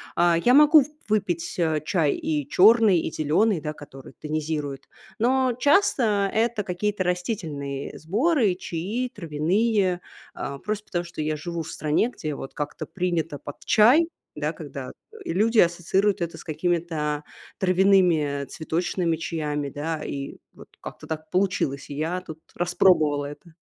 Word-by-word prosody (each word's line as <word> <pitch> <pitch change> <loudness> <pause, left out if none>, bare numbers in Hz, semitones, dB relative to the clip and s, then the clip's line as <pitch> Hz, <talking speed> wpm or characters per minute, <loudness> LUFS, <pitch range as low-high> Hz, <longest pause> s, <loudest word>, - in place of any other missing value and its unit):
А, 170 -1 +4
я 245 +9 +3
могу 300 +1 +8
в - - -9 0.2
выпить, 180 -5 -1
а, 160 -3 +1
чай 155 -2 +1
и 150 -3 -2
черный, 210 0 +6
и 160 - -3
зеленый, 165 +6 +1
да 150 0 -4
который 135 -3 -12
тонизирует. 150 -2 -4 0.3
Но 255 +2 +2
часто 235 - +3
это 225 -1 +1
какие-то 190 +2 -2
растительные 165 -7 -3
сборы 220 - +2
и - - -11
чаи 205 +11 -3
травяные. 185 +3 0 0.3
А 140 0 -5
просто 215 0 -4
потому, 175 -1 -2
что 170 -2 -7
я 155 0 -1
живу 170 +1 -4
в - - -8
стране, 155 +9 +1
где 155 - -5
вот 135 - -8
как-то 150 0 -5
принято 170 -5 -2
под 145 - -9
чай, 255 +10 +5 0.3
да, - - -2
когда, - - -8 0.2
э, 445 - -13
люди 220 +6 +1
ассоциируют 180 +3 +2
это 170 -1 -3
с - - -11
какими-то 155 -2 -1 0.3
травяными 180 -7 +3
цветочными 165 +2 -2
чаями, 150 -3 -3
да? 155 +2 -4
И 140 0 -5 0.2
вот - - -15
как-то - - -9
так 155 0 -5
получилось. 180 -8 0
И 140 - -6
я 165 +5 -2
тут 160 -3 -10 0.2
распробовала 175 -5 +3
это. 160 +3 -10
175 Hz, 150 wpm, -25 LUFS, 150-205 Hz, 0.3 s, могу